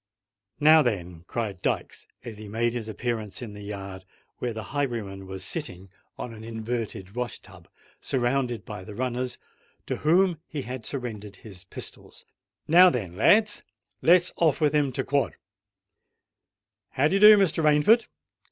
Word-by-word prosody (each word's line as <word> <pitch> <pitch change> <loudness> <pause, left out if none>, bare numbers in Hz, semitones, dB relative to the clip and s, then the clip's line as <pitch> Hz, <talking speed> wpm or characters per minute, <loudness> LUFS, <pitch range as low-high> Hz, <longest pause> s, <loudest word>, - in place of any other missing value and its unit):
"Now, 155 +1 +7
then," 90 - -3
cried 105 -6 -4
Dykes, - - -2 0.2
as 110 -3 -8
he 110 - -9
made 115 +3 0
his 115 -3 -4
appearance 110 0 -4
in 110 -4 -7
the 105 - -10
yard, 100 -2 -7 0.4
where 125 - -2
the 110 -1 -6
highwayman 110 -9 -3
was 95 -1 -6
sitting 90 +1 -5 0.3
on 120 - -6
an 110 0 -11
inverted 110 -3 -5
wash 125 0 -3
tub, - - -17 0.3
surrounded 120 -3 -1
by 105 -3 -7
the 100 +2 -10
runners, 125 +1 -2 0.5
to - - -3
whom 175 +2 +3
he 145 -3 -5
had 125 -1 -6
surrendered 110 -7 -6
his 95 -3 -12
pistols;—"now, 175 - +1
then 100 - -4
lads—let's 185 - +2
off 160 -4 +2
with 150 -1 +2
him 145 -3 +2
to 130 - -1
quod. 140 0 0 1.6
How 140 +2 +3
d'ye 195 +5 +1
do, 210 +1 +10
Mr. 175 -5 +2
Rainford! 155 +10 +4
120 Hz, 145 wpm, -26 LUFS, 105-150 Hz, 1.6 s, do